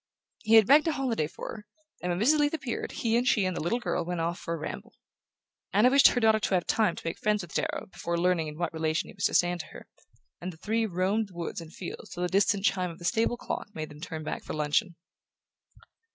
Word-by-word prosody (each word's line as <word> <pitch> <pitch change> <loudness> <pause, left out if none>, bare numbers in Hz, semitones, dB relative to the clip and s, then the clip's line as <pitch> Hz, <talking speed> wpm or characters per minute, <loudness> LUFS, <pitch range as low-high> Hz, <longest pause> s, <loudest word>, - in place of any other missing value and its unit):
He 225 0 +3
had 220 -2 +8
begged 295 - +6
a 325 - +2
holiday 245 - -1
for - - -8
her, 210 -2 -8 0.4
and 180 - -1
when 175 - -1
Mrs. 295 +8 +4
Leath 290 +1 +2
appeared 255 -7 -4
he 230 -1 0
and 245 +2 +2
she 210 -6 +3
and 185 -1 -1
the - - -3
little 175 +9 0
girl 180 -7 -1
went 175 0 -3
off 170 +2 -1
for 170 - -3
a - - -5
ramble. 155 - -7 0.8
Anna 215 +6 +5
wished 275 0 +8
her 245 - +2
daughter 220 -1 +4
to 195 - 0
have 180 - 0
time 215 -6 +2
to - - -10
make 165 - -3
friends 210 -2 +1
with 170 - -11
Darrow - - -2
before 170 0 -3
learning 170 -2 +1
in 150 0 -7
what 170 -1 -2
relation 160 0 -1
he - - -11
was - - -2
to - - +1
stand 175 0 +3
to - - -6
her; - - -12 0.6
and 180 +1 -4
the 160 - -15
three 220 +5 0
roamed 195 +4 0
the 185 - -18
woods 170 0 -4
and 160 -1 -11
fields 175 - -8
till 175 - -4
the 180 - 0
distant 195 +1 +2
chime 185 -4 +1
of 165 - -9
the 175 - -9
stable 230 +4 +1
clock - - -4
made 155 -1 -4
them 150 0 -13
turn 160 -2 -5
back - - -4
for - - -6
luncheon. 155 +5 0
185 Hz, 255 wpm, -28 LUFS, 170-225 Hz, 0.8 s, had